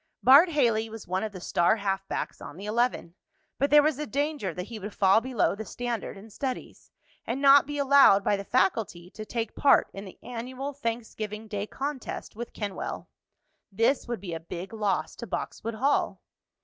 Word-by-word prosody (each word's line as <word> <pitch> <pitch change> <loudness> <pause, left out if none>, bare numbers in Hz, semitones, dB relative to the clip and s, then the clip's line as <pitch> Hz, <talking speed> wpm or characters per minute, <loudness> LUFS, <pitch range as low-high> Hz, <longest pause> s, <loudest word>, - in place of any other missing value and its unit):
Bart 285 +8 +8
Haley 230 -8 +1
was 225 -1 -9
one 185 +2 -1
of 215 - -3
the 190 - -8
star 175 +4 +2
halfbacks 195 -1 -3
on 145 - -9
the 195 - -8
eleven, 225 -5 0 0.5
but 280 +2 +2
there 295 0 +7
was 300 -2 +1
a 300 - -3
danger 285 - -1
that 180 +2 -5
he 220 +3 -8
would 205 +1 -7
fall 195 +2 +4
below 250 -2 +1
the 210 +2 -6
standard 235 -1 -4
in 215 +3 -13
studies, 260 +4 -5 0.4
and 245 +3 -2
not 275 0 +7
be 290 0 -4
allowed 275 -8 +6
by 205 - +2
the 200 - -5
faculty 205 - 0
to 215 - -8
take 230 -2 -3
part 280 - +4
in 195 - -7
the 190 - -11
annual 255 +4 -5
Thanksgiving 225 -4 -5
day 205 0 -4
contest 275 -3 -5
with 235 +2 -6
Kenwell. 205 -3 -5 0.6
This 230 +8 +1
would 240 -5 -4
be 180 -4 -6
a 165 - -4
big 175 +4 -8
loss 210 -3 -1
to - - -7
Boxwood 230 0 -4
Hall. 270 +6 +1
225 Hz, 190 wpm, -27 LUFS, 200-265 Hz, 0.6 s, Bart